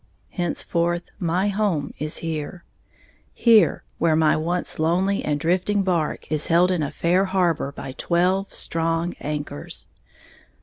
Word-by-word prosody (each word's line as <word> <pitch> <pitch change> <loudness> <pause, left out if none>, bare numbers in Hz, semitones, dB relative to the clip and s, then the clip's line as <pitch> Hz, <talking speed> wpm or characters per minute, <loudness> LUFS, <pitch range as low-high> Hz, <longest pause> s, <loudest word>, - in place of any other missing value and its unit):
Henceforth 175 -1 -1
my 180 +2 +1
home 195 -8 -1
is 150 +1 -2
here, 160 +2 -4 0.7
here, 230 -3 +4 0.2
where 165 -2 +3
my 155 -1 +4
once 170 +3 -2
lonely 180 +5 +1
and 150 -1 0
drifting 185 +5 +1
barque 170 -6 -1
is 150 -1 0
held 175 +2 +4
in 180 -3 0
a 145 - -1
fair 180 +3 +1
harbor 180 -7 0
by 135 -1 -7
twelve 180 +7 0
strong 165 +1 -1
anchors. 145 - -4
170 Hz, 130 wpm, -23 LUFS, 155-185 Hz, 0.7 s, here